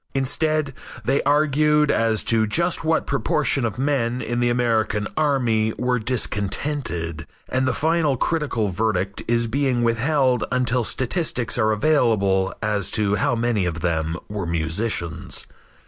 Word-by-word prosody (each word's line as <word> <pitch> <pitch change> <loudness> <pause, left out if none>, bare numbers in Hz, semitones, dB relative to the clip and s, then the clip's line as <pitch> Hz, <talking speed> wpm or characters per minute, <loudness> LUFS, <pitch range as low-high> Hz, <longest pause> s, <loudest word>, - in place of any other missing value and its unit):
Instead 145 +2 0 0.3
they 135 +2 +2
argued 150 0 +3
as 115 -1 +1
to 110 -1 +2
just 170 +10 +1
what 160 0 +1
proportion 140 +1 0
of 110 -2 -2
men 125 -3 0
in 120 -1 -2
the 120 0 +2
American 115 -4 0
army 120 -8 +1
were 125 0 0
discontented, 105 - -2 0.2
and 130 0 0
the - - +2
final 155 -3 +1
critical 140 -9 -1
verdict 100 0 -1
is 120 0 +2
being 125 0 0
withheld 125 +2 +1
until 125 -1 +1
statistics 130 - 0
are 110 -2 +2
available 105 -7 +2
as 105 -3 0
to 105 -2 +1
how 105 +4 +1
many 115 -3 0
of 85 -3 -3
them 80 -1 -1
were 100 -4 -4
musicians. 85 +1 -2
120 Hz, 135 wpm, -22 LUFS, 105-140 Hz, 0.3 s, argued